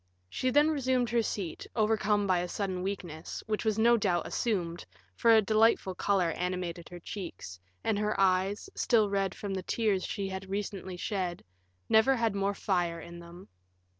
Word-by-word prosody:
She 255 - 0
then 295 +4 +4
resumed 260 -5 +1
her 235 -1 +3
seat, 195 -6 -4
overcome 210 -2 +2
by 185 -2 +2
a 175 - -2
sudden 190 -1 -3
weakness, 180 -4 -5
which 215 -1 -2
was 220 -2 +1
no 235 +2 +5
doubt 180 -5 +1
assumed, 175 -7 -2 0.3
for 230 - +2
a 220 -1 +6
delightful 215 -2 +3
color 185 -2 +1
animated 180 -1 -3
her 175 - -9
cheeks, 170 - -7 0.2
and 210 -2 +1
her 210 -1 -1
eyes, 195 - +2
still 220 -4 +2
red 195 -2 0
from 200 -2 -4
the 190 - -2
tears 205 -1 0
she 200 -2 -3
had 190 0 -6
recently 195 -2 -4
shed, 180 -2 -3 0.4
never 240 +5 +5
had 230 -3 +1
more 200 0 0
fire 175 -4 0
in 170 +1 -10
them. 170 +2 -12
195 Hz, 170 wpm, -30 LUFS, 180-220 Hz, 0.4 s, a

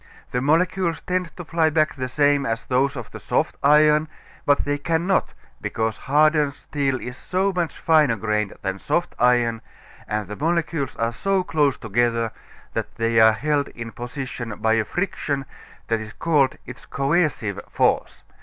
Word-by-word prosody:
The 125 - 0
molecules 165 +3 +1
tend 180 -1 -2
to 175 - -7
fly 165 0 +2
back 155 0 +2
the 130 -2 -4
same 145 +2 +2
as 115 -3 -2
those 135 +2 +1
of 120 -4 -7
the - - -8
soft - - 0
iron, 150 +2 +5 0.4
but 145 0 +3
they 145 0 -1
cannot 170 +5 0 0.3
because 110 -1 -1
hardened 150 0 +3
steel 140 -3 -2
is 125 0 -7
so 190 +2 0
much 175 -3 -2
finer 155 -8 +4
grained 105 -1 -1
than 95 0 -2
soft 175 - -1
iron, 120 -2 +3 0.5
and 105 -2 -2
the 105 - -6
molecules 165 -1 -1
are 115 +1 -1
so 195 +8 0
close 150 -6 +1
together 115 0 0 0.4
that - - -4
they 115 0 +2
are 110 0 +7
held 145 +4 0
in 115 -1 -8
position 120 -3 -6
by 110 0 +2
a 115 -1 +2
friction 145 - -2 0.4
that 115 -1 +1
is 110 0 -8
called 145 -5 +2
its - - -11
coercive 140 - 0
force. - - 0
140 Hz, 165 wpm, -23 LUFS, 115-160 Hz, 0.5 s, are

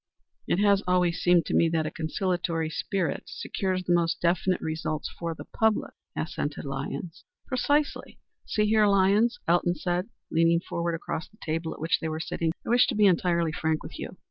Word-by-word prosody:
"It - - +2
has 200 0 +4
always 180 -1 +2
seemed 175 -2 +4
to - - -3
me 165 - +4
that 160 -1 0
a - - -3
conciliatory 165 -1 -1
spirit 175 -1 -2
secures 185 -1 -2
the 175 - +1
most 170 -1 +2
definite 180 +2 +1
results 155 -1 -3
for 170 -1 -4
the - - -9
public," 220 -1 0 0.2
assented 145 -2 -3
Lyons. 140 +5 -5 0.2
"Precisely. 285 +3 0 0.3
See 210 - 0
here, 215 0 +4
Lyons," 200 +4 +3
Elton 175 +1 +3
said, 175 +5 -2 0.2
leaning 165 +1 +4
forward 170 -1 -2
across 165 -1 -5
the 215 - -24
table 160 +1 -2
at - - -14
which 160 +2 +1
they 160 - -3
were 155 0 -3
sitting, 160 0 -1
"I - - -5
wish 245 +1 +5
to 250 - -1
be 210 0 +4
entirely 170 -3 +3
frank 160 0 -1
with - - -9
you. - - -7
175 Hz, 185 wpm, -27 LUFS, 160-195 Hz, 0.3 s, wish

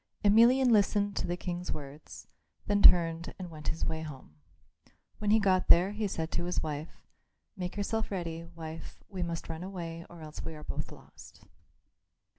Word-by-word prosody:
Emelian 240 +5 +6
listened 205 -1 +3
to - - -1
the 175 +1 -2
King's 180 0 -4
words; 145 +1 -8 0.4
then 205 0 +1
turned 165 -2 +6
and 180 -3 -7
went 155 -1 -9
his 160 - -1
way 160 0 -2
home. 140 - -9 0.9
When 210 - -1
he 215 - +6
got 190 -3 +2
there 180 +3 +6
he 210 0 -2
said 165 -4 -3
to 175 - -2
his 180 - -1
wife, 155 0 -6 0.5
"Make 180 0 -5
yourself 220 +2 -1
ready, 170 -4 -4
wife; 160 0 -8
we 190 -3 -5
must 170 -1 -3
run 160 0 -5
away 170 -3 -6
or 170 -1 -12
else 155 -1 -8
we 160 - -6
are 150 - -10
both - - -5
lost." - - -15
175 Hz, 175 wpm, -30 LUFS, 160-200 Hz, 0.9 s, Emelian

